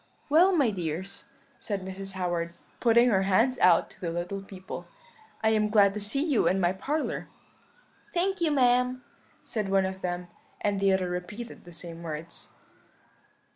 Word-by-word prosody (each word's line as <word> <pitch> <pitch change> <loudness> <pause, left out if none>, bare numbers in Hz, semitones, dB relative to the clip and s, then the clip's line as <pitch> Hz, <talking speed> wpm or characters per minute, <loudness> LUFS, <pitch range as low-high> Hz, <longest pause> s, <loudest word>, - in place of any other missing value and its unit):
"'Well, 340 +6 +6
my 285 - +3
dears,' 180 +1 -4 0.3
said 200 -4 -4
Mrs. 190 0 -6
Howard, 175 -2 -2 0.2
putting 235 +1 +5
her 195 -4 +3
hands 225 +7 +2
out 175 -2 +5
to - - -20
the 175 - -2
little 175 +4 -3
people, 190 -1 -8 0.6
'I 220 - +5
am 215 -1 +2
glad 200 -2 +5
to 210 - -3
see 215 +8 0
you 295 -8 +2
in 190 - +2
my 175 0 +2
parlour.' 295 +11 -2 0.8
"'Thank 380 +1 0
you, 330 - +3
ma'am,' 250 -2 +3 0.4
said 215 -4 -3
one 195 -1 +3
of 190 0 -5
them; 180 0 -3 0.3
and 205 -1 0
the 195 0 +3
other 190 -1 +1
repeated 180 +7 -6
the 175 - -11
same 170 0 -8
words. 165 0 -6
195 Hz, 165 wpm, -28 LUFS, 180-240 Hz, 0.8 s, Well